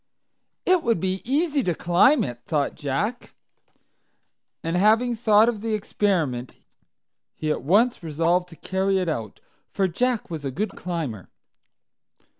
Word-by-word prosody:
"It 365 -1 +4
would 230 - +1
be 190 +2 -2
easy 290 +3 +1
to 180 -8 -1
climb 195 - +4
it," 120 -2 -5
thought 145 -3 0
Jack. 165 - -3 1.3
And, 165 +1 -2
having 220 +6 +3
thought 220 -1 +4
of 225 -4 -1
the 225 -1 -1
experiment, 165 -12 -1 0.8
he 155 -1 -2
at - - -2
once 210 - +2
resolved 170 +3 0
to 165 - -13
carry 190 +3 0
it 185 -2 -1
out, 115 -10 -4 0.3
for 195 - 0
Jack 240 +3 -1
was 160 -3 -5
a 135 - -2
good 195 +12 -3
climber. 155 - -5
185 Hz, 140 wpm, -24 LUFS, 160-225 Hz, 1.3 s, It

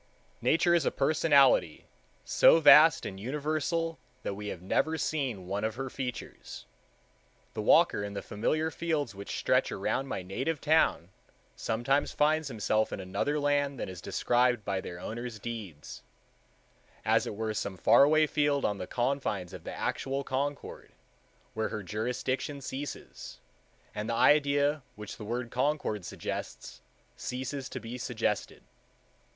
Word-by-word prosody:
Nature 170 +2 +3
is 170 -3 +3
a - - +2
personality 140 - +3 0.4
so 165 - +6
vast 155 +1 +7
and 95 - -6
universal 155 - -2 0.2
that - - -2
we 105 +1 -7
have 90 - -5
never 160 +11 +1
seen 130 -13 -2
one 100 +3 -3
of 110 0 -1
her 135 0 -5
features. 125 -3 -6 0.9
The - - -3
walker 100 - +4
in 100 0 -5
the 100 - -4
familiar 155 +10 -1
fields 155 -9 -2
which 100 +1 -6
stretch - - +2
around 135 - -1
my 95 -8 -4
native 130 - -2
town 150 - +2 0.5
sometimes 130 +6 0
finds 155 +1 +2
himself 110 -3 0
in - - -4
another 120 +11 -1
land 145 -2 0
than - - -4
is 90 -2 -8
described 120 -1 +1
in 95 -2 -1
their 85 -1 -8
owners' 120 +4 -6
deeds, 105 -9 -7 1.0
as - - +3
it - - -5
were 110 +1 -3
in - - -1
some 100 -2 -4
faraway 155 - +5
field 145 -2 +1
on 105 -1 -1
the 90 - -5
confines 120 -8 -2
of - - -10
the - - -5
actual 135 +1 -2
Concord, 140 +2 -4 0.6
where 110 0 -1
her 105 - -5
jurisdiction 125 +7 -3
ceases, 140 +1 -7 0.6
and 105 +2 -4
the 115 - 0
idea 145 +2 +3
which 105 -1 -8
the 105 - -8
word 120 +2 -3
Concord 125 - -1
suggests - - -6 0.3
ceases 130 +1 -5
to - - -5
be 120 +2 -7
suggested. 115 -4 -2
125 Hz, 145 wpm, -29 LUFS, 105-145 Hz, 1.0 s, vast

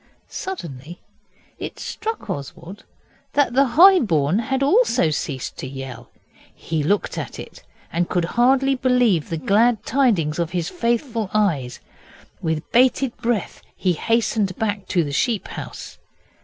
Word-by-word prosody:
Suddenly 170 - -7 0.6
it - - -6
struck 445 +1 -5
Oswald 170 +8 -7 0.5
that 285 -4 +2
the 275 +2 +4
High 375 +2 +9
born 165 - +1 0.2
also 285 - +3
had 155 -2 +2
ceased 135 -3 -4
to - - -5
yell. 130 -3 -8 0.5
He 160 -2 -3
looked 200 +8 0
at - - -6
it, - - -10 0.3
and 170 +1 0
could 175 -2 0
hardly 265 +3 +3
believe 250 - +2
the 165 - -2
glad 215 - +2
tidings 205 - +1
of 170 -2 0
his 175 -2 -1
faithful 235 - -1
eyes. 150 - 0 0.6
With 160 -1 -3
bated 255 +1 +3
breath 235 -3 -2
he 185 -2 +1
hastened 215 0 0
back 205 -3 -2
to 175 - +1
the 145 -2 -5
sheep 220 - 0
house. - - -8
205 Hz, 140 wpm, -22 LUFS, 160-250 Hz, 0.6 s, High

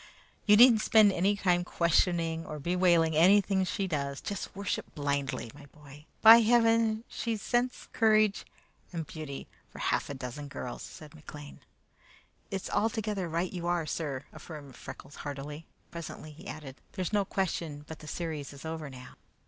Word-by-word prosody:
You 210 0 +7
needn't 235 -2 +8
spend 215 -2 +6
any 195 +4 +2
time 180 -3 +2
questioning 170 -1 +1
or 155 - -6
bewailing 170 0 +2
anything 190 +3 +5
she 195 +2 -2
does. 140 -5 -2
Just 200 -2 -5
worship 200 -1 -4
blindly, 140 -5 -2
my 145 0 -14
boy. 150 +1 -15 0.2
By 225 +1 +11
heaven! 225 -1 +3
she's 230 -2 -3
sense, 245 +3 -1
courage, 215 -2 +3 0.5
and 165 -3 -4
beauty 150 -3 -7 0.2
for - - -14
half - - 0
a 140 - -4
dozen 130 +3 -6
girls," 125 -3 -6
said 155 -1 -10
McLean. 150 -2 -11 0.9
"It's 195 -1 -4
altogether 210 -3 -1
right 170 +4 -1
you 175 -2 -4
are, 175 -2 +1
sir," 145 -3 -3
affirmed 145 -5 -10
Freckles - - -10
heartily. 145 +2 -7 0.2
Presently 165 -2 -8
he 150 - -13
added, 140 -4 -8 0.2
"There's 185 +1 -3
no 205 -1 +3
question 170 -6 -3
but 160 +1 -9
the 155 - -11
series 155 -3 -4
is 140 +2 -11
over 160 -2 -5
now." 125 -1 -12
170 Hz, 155 wpm, -30 LUFS, 145-200 Hz, 0.9 s, By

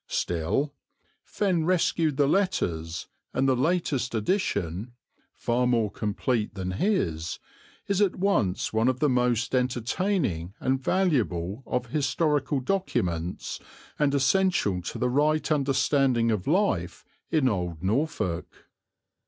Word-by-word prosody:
Still, 90 - -1 0.5
Fenn 185 -6 0
rescued 165 -4 +1
the 145 - +4
letters, 85 - 0 0.3
and 135 +1 +2
the 130 - +4
latest 135 -4 0
edition 105 - -1 0.4
far 125 +1 0
more 115 -4 +1
complete 105 +2 -1
than 95 -1 -3
his 90 - -1 0.5
is 200 0 +1
at 200 -3 +3
once 180 - 0
one 110 +2 +2
of 130 -1 +1
the 150 - +3
most 125 -3 +1
entertaining 125 - 0
and 130 +1 0
valuable 120 - 0
of 125 -1 -2
historical 145 -1 +1
documents 105 - -2 0.4
and 145 -1 +2
essential 140 - +2
to - - -5
the 125 - +1
right 150 +4 +1
understanding 135 -4 +2
of 105 -4 -2
life 155 - 0 0.2
in 150 -5 +2
old 90 -7 -2
Norfolk. 100 - -2
130 Hz, 120 wpm, -27 LUFS, 100-155 Hz, 0.5 s, the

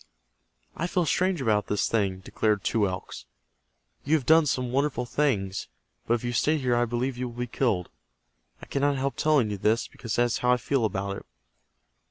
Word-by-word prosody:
"I 170 - -2
feel 180 -1 0
strange 180 0 +1
about 105 -3 +1
this 105 - 0
thing," 100 -4 0
declared 105 0 0
Two 105 -3 +2
Elks. 90 -1 -6 0.8
"You 150 +3 +2
have 145 -5 -1
done 160 +1 +5
some 130 -2 -1
wonderful 135 -2 0
things, 105 -9 -1 0.4
but 120 - +3
if 120 - -5
you 120 0 -2
stay 155 +6 +2
here 125 -4 +1
I 120 0 +2
believe 120 +2 -2
you 125 -1 -2
will 120 - -13
be 125 - -1
killed. 115 -7 0 0.8
I - - -6
cannot 140 0 0
help 135 +1 -1
telling 145 -8 +2
you 100 - -4
this, 110 +4 +1
because 115 -3 -5
that 120 - +4
is 120 -2 0
how 125 - +2
I - - +2
feel 130 -1 0
about 100 -1 -2
it." - - -11
120 Hz, 200 wpm, -27 LUFS, 110-140 Hz, 0.8 s, done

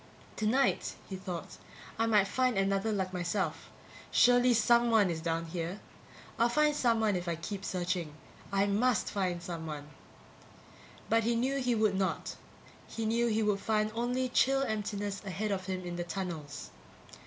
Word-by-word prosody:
Tonight, 240 +6 +1
he 190 - -5
thought, 180 -3 -6 0.4
I 225 - +2
might 210 -3 +4
find 255 -1 +1
another 195 +2 +1
like 190 -3 -2
myself. 180 +2 -2 0.4
Surely, 245 0 +5
someone 235 -4 +4
is 160 -1 -4
down 165 0 -1
here; 170 +3 -4 0.6
I'll 235 +1 +4
find 300 +3 +3
someone 225 -6 +2
if 175 0 -3
I 170 - 0
keep 195 +4 -6
searching. 175 -5 -2 0.4
I 195 0 +3
must 215 +3 +1
find 180 -4 -1
someone! 160 -4 -6 1.2
But 225 0 +3
he 235 +2 +1
knew 260 +4 0
he 250 -2 +1
would 215 -2 +2
not. 190 0 -1 0.5
He 225 - -4
knew 230 +2 +2
he 220 -1 +1
would 205 -2 +1
find 215 0 0
only 245 +3 0
chill 270 +2 +3
emptiness 205 -4 -3
ahead 200 +2 -3
of 190 -1 -2
him 185 -1 -3
in 175 0 -4
the 175 - -2
tunnels. 170 -6 -5
205 Hz, 155 wpm, -31 LUFS, 180-230 Hz, 1.2 s, Surely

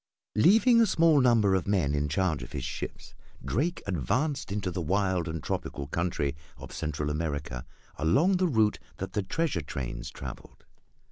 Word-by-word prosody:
Leaving 225 - +5
a 225 - +5
small 165 -5 +4
number 115 -6 +4
of 95 -2 0
men 90 -8 +2
in 75 0 0
charge 80 -1 0
of - - -9
his - - -3
ships, - - -6 0.3
Drake 170 +7 -1
advanced 110 - -1
into 100 -3 -2
the 90 0 -3
wild 95 0 +1
and 80 -1 -4
tropical 70 - -3
country 75 -2 -1 0.2
of - - -10
Central 75 -1 -2
America 75 -5 -3 0.3
along 155 - +3
the 185 0 +2
route 110 -8 +2 0.2
that 95 0 -5
the 105 - +1
treasure 130 - -1
trains 65 -4 -5
traveled. - - -10
95 Hz, 160 wpm, -28 LUFS, -, 0.3 s, Leaving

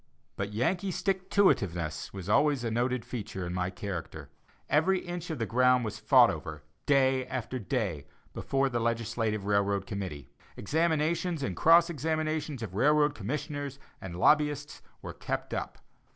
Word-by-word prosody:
But 100 +1 -3
"Yankee 175 - 0
stick 190 +1 -2
to 200 -1 +5
it - - +1
iveness" 85 -4 -4
was 95 -2 -8
always 140 +4 +3
a 115 - -1
noted 120 +1 0
feature 100 -6 -5
in 85 - -4
my 90 0 -1
character. 95 -2 -6 0.4
Every 160 +6 +3
inch 175 -1 -6
of 160 - -3
the 115 - -1
ground 125 +3 +3
was 110 - -5
fought - - +6
over, 75 -1 -7 0.2
day 130 -2 +3
after 130 0 -4
day, 100 - -2 0.3
before 135 0 0
the 120 -3 -1
legislative 115 -2 -1
railroad 100 -1 +1
committee. 95 - -6 0.3
Examinations 160 - 0
and 95 -9 -2
cross 170 +1 +6
examinations 155 -3 -2
of 100 -5 -6
railroad 150 +6 +3
commissioners 145 +3 -4 0.2
and 90 -2 -7
lobbyists 145 +7 +2 0.2
were - - -6
kept - - -4
up. - - -4
125 Hz, 155 wpm, -29 LUFS, 100-150 Hz, 0.4 s, fought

